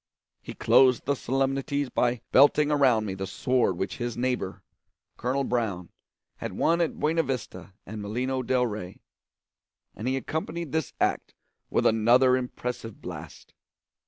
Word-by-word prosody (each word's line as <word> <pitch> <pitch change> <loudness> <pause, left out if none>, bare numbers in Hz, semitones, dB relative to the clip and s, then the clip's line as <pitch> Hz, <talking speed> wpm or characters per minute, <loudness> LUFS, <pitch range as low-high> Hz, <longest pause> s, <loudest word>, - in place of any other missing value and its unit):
He - - -9
closed 130 -2 +4
the 140 - +2
solemnities 135 +1 -1
by 120 -1 +1
belting 145 +2 +5
around 130 -7 +3
me 95 - -3
the 95 0 -5
sword 120 -2 +1
which 95 - -3
his 120 -1 -4
neighbour, 125 -6 -2 0.5
colonel 130 +3 -1
Brown, 110 -9 -2 0.5
had - - -5
worn 170 +2 +2
at 165 - -1
Buena 160 +2 +2
Vista 110 - -5
and 105 +2 -7
Molino 125 +6 -2
del 125 0 +1
Rey; 105 -5 -6 1.0
and 110 - -5
he 130 +1 +1
accompanied 160 +2 -4
this 160 0 -2
act - - -1 0.3
with - - +1
another 120 +4 +5
impressive 125 -3 -5
blast. - - -9
125 Hz, 140 wpm, -27 LUFS, 110-135 Hz, 1.0 s, belting